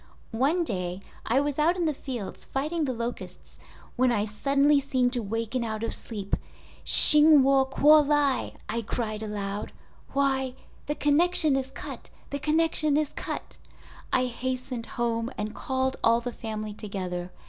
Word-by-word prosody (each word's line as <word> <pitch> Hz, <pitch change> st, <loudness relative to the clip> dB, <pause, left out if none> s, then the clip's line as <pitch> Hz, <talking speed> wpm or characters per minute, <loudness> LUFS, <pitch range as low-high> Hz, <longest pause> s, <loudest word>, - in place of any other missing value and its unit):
"One 285 Hz, +10 st, +1 dB
day 180 Hz, -, -4 dB, 0.3 s
I 245 Hz, +4 st, +3 dB
was 290 Hz, 0 st, -2 dB
out 335 Hz, +4 st, +3 dB
in 350 Hz, -, 0 dB
the 310 Hz, -, +1 dB
fields 250 Hz, -7 st, -7 dB
fighting 305 Hz, +4 st, -2 dB
the 265 Hz, -, -1 dB
locusts 235 Hz, 0 st, -7 dB, 0.4 s
when 255 Hz, 0 st, +2 dB
I 210 Hz, -3 st, 0 dB
suddenly 280 Hz, +7 st, +2 dB
seemed 255 Hz, -2 st, 0 dB
to 245 Hz, -, -1 dB
waken 225 Hz, +3 st, -3 dB
out 220 Hz, -1 st, -4 dB
of 230 Hz, -, -2 dB
sleep. 205 Hz, -4 st, -4 dB, 0.5 s
"Hsing 300 Hz, -1 st, +8 dB
Wu 270 Hz, 0 st, +4 dB
kuo 300 Hz, +3 st, +5 dB
lai" 290 Hz, -3 st, +1 dB
I 230 Hz, -, -2 dB
cried 215 Hz, -1 st, -4 dB
aloud—'Why! 235 Hz, +6 st, -3 dB, 0.3 s
the 295 Hz, -, -1 dB
connection 305 Hz, 0 st, +3 dB
is 265 Hz, 0 st, -2 dB
cut! -, -, -8 dB, 0.2 s
The 285 Hz, -, -3 dB
connection 310 Hz, -1 st, +2 dB
is 305 Hz, -2 st, 0 dB
cut!' -, -, -6 dB, 0.5 s
I 255 Hz, -, +2 dB
hastened 255 Hz, -1 st, -4 dB
home 230 Hz, -1 st, -2 dB
and 210 Hz, +1 st, -4 dB
called 260 Hz, +2 st, -2 dB
all 230 Hz, +1 st, +4 dB
the 240 Hz, 0 st, -6 dB
family 215 Hz, -2 st, -5 dB
together. 185 Hz, -4 st, -5 dB
255 Hz, 150 wpm, -26 LUFS, 225-285 Hz, 0.5 s, Hsing